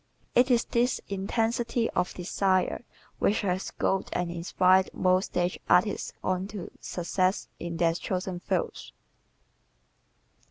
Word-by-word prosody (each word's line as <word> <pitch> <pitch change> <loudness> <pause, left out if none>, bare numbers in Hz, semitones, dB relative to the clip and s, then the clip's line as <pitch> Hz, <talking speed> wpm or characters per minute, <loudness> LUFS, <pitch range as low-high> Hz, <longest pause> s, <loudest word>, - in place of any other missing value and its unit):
It 245 +2 +5
is 240 -2 +3
this 240 +1 +1
intensity 230 +4 0
of 180 - -1
desire 185 +3 0 0.4
which 210 - +2
has 185 -1 -1
goaded 195 0 -1
and 175 -1 -1
inspired 185 +2 +3
most 185 +1 +3
stage 175 0 -1
artists 195 +3 +3
on 185 +1 0
to 200 -3 -7
success 185 +2 -1
in 170 -1 -4
their 165 -1 +3
chosen 185 +1 -3
fields. 465 - -3
185 Hz, 120 wpm, -28 LUFS, 180-215 Hz, 0.4 s, It